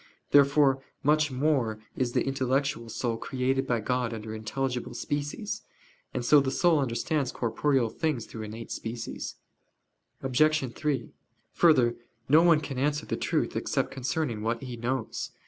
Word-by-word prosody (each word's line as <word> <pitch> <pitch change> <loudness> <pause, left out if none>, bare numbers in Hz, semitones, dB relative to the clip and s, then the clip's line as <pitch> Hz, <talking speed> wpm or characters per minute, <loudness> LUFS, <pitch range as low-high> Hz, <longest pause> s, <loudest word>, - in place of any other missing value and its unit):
Therefore 140 -1 +5 0.2
much 150 +1 +3
more 130 -5 +1 0.2
is 125 -2 -1
the - - +1
intellectual 135 -2 0
soul 115 0 -2
created 130 +2 -1
by 120 -2 +1
God 125 0 -1
under 110 0 -6
intelligible 125 +3 -3
species. 200 +10 -3 0.5
And 120 - -3
so 150 +3 +7
the 135 -1 0
soul 165 +3 +3
understands 135 +2 0
corporeal 120 0 +1
things 150 -6 -1
through 110 - -8
innate 110 +2 -7
species. 115 0 -5 0.9
Obj. 135 0 +2
3: 150 -3 -2 0.4
Further, 130 -8 +4 0.3
no 155 +4 +7
one 165 -3 +5
can 135 -4 -5
answer 150 +2 0
the - - -2
truth - - -1
except - - -1
concerning 130 -3 -2
what 115 +4 -1
he 125 -2 -5
knows. 125 +3 -3
130 Hz, 145 wpm, -28 LUFS, 120-145 Hz, 0.9 s, so